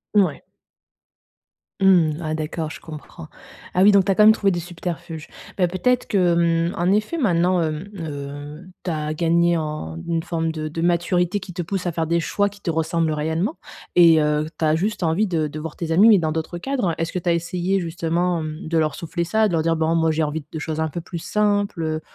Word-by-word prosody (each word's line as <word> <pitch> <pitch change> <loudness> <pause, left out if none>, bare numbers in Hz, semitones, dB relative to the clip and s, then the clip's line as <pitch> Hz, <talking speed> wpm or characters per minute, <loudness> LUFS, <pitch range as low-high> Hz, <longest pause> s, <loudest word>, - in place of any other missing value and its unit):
Mouais. 185 -9 +2 1.4
Mmh. 175 -6 +4
Ah 155 -1 -2
d'accord, 155 0 -3
je - - -9
comprends. 160 +1 -10 0.5
Ah 180 - +2
oui, 205 +2 +7
donc 200 -2 +4
tu 195 - +2
as - - +1
quand 210 - +5
même 215 - +9
trouvé 200 -3 +2
des 175 - -1
subterfuges. 170 -2 -6 0.3
Bah, 180 -2 +3
peut-être 240 +8 0
que, 170 -3 +2
hem, - - -6
en 175 +1 +2
effet 215 +11 0
maintenant, 180 - +2
hem, 155 +4 -4
heu, 145 0 -7 0.2
tu 180 - -2
as 155 -1 -2
gagné 170 +1 +2
en 150 - -4
une 165 -1 0
forme 165 -2 -2
de 155 -1 -4
de 160 +2 -5
maturité 175 +2 +1
qui 185 -1 -9
te 175 0 -4
pousse 185 +1 -3
à - - 0
faire 165 0 -1
des 170 +1 +1
choix 205 +5 0
qui 200 0 -11
te 180 - -3
ressemblent 160 0 0
réellement 160 - -1 0.4
et 165 -3 +7
heu, 150 0 +1
tu 160 - +1
as 155 0 +3
juste 205 +6 -1
envie 165 +6 +2
de 160 -4 0
de 150 +1 -7
voir 155 0 -6
tes 165 -1 -4
amis, 190 +7 +6
mais 210 -3 +7
dans 160 -2 -1
d'autres 160 +2 -4
cadres. 245 -6 -1
Est-ce 165 0 -1
que 180 - -2
tu 175 - -2
as - - +4
essayé 175 +3 -1
justement, 170 +1 -1
hem, 155 0 -6
de 165 +1 0
leur 155 -2 +1
souffler 170 +1 -3
ça? 215 +6 +2
De 190 - -3
leur 160 -1 +1
dire: 165 0 +2
«Bon 160 +1 +1
moi 160 -1 +2
j'ai 155 +1 0
envie 150 0 -3
de 160 - -5
choses 155 0 -4
un 160 0 0
peu 170 +4 -5
plus 170 +1 -7
simples, 205 -1 0
heu, 155 0 -2
170 Hz, 230 wpm, -22 LUFS, 160-180 Hz, 1.4 s, même